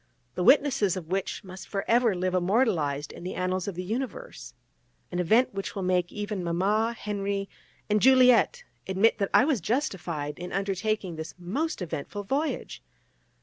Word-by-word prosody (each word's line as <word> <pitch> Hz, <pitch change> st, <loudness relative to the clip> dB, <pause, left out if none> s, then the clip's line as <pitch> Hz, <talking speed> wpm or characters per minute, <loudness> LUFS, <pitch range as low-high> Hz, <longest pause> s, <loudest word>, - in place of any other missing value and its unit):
the 180 Hz, -, -2 dB
witnesses 245 Hz, -, +4 dB
of 165 Hz, -3 st, -7 dB
which 190 Hz, +1 st, -2 dB
must 185 Hz, 0 st, -10 dB
for 195 Hz, -1 st, -3 dB
ever 235 Hz, -3 st, +3 dB
live 185 Hz, +1 st, -1 dB
immortalised 180 Hz, -, +1 dB
in -, -, -11 dB
the 180 Hz, -, -5 dB
annals 185 Hz, 0 st, -1 dB
of 200 Hz, -, -4 dB
the 180 Hz, -, -4 dB
universe, 260 Hz, -, -5 dB, 0.6 s
an 175 Hz, -, -2 dB
event 220 Hz, +9 st, +3 dB
which 195 Hz, +2 st, -5 dB
will 195 Hz, -, -3 dB
make 180 Hz, -1 st, +1 dB
even 205 Hz, -2 st, -4 dB
Mama, 205 Hz, +7 st, +1 dB
Henri 200 Hz, -1 st, -2 dB, 0.4 s
and 210 Hz, 0 st, +2 dB
Juliette 260 Hz, -, +5 dB, 0.2 s
admit 195 Hz, +5 st, +3 dB
that 200 Hz, -, 0 dB
I 250 Hz, -, +6 dB
was 275 Hz, -, +1 dB
justified 170 Hz, -, -2 dB
in 180 Hz, +1 st, -6 dB
undertaking 195 Hz, -2 st, -2 dB
this 160 Hz, 0 st, -7 dB
most 205 Hz, -, -2 dB
eventful 175 Hz, +5 st, -5 dB
voyage. 280 Hz, +9 st, -2 dB
195 Hz, 160 wpm, -27 LUFS, 180-225 Hz, 0.6 s, I